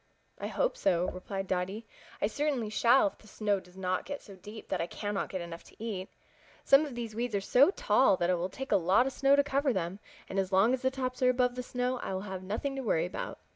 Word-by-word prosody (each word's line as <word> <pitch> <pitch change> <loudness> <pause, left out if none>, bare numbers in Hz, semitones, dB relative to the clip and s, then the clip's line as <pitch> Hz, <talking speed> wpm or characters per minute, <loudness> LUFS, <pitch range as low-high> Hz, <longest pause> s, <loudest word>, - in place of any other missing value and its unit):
"I - - -3
hope - - 0
so," 180 -2 +1
replied 195 +1 -5
Dotty. 190 +4 -2 0.4
"I - - +6
certainly 255 -1 -1
shall 245 +7 +5
if 300 - -3
the 215 - -18
snow 205 -1 0
does 180 0 -18
not 185 -1 -1
get 285 0 -4
so 200 - -13
deep 210 +4 -11
that 190 - 0
I 170 - -2
cannot 205 +1 -3
get 185 - -4
enough 170 0 -8
to - - -17
eat. 205 -4 -5 0.5
Some 280 +3 +5
of 265 - -8
these 230 -2 -5
weeds 235 0 -2
are - - +2
so 250 - +5
tall 385 - +3
that 175 0 +1
it - - +3
will 175 +2 -2
take 265 +7 -7
a 205 - +6
lot 190 +7 +3
of 270 - -2
snow 275 +2 +4
to 285 - +4
cover 275 0 +1
them, 185 0 -3 0.3
and 195 - -2
as 190 0 -1
long 195 +6 +4
as 260 - -1
the 260 - +2
tops 255 -1 -4
are 255 - +5
above 250 0 +2
the 250 - -4
snow 250 0 -2
I - - -4
will 190 - -3
have 190 -2 -6
nothing 220 +9 -3
to - - -2
worry 170 -9 +1
about. 180 - -5
215 Hz, 255 wpm, -30 LUFS, 190-255 Hz, 0.5 s, I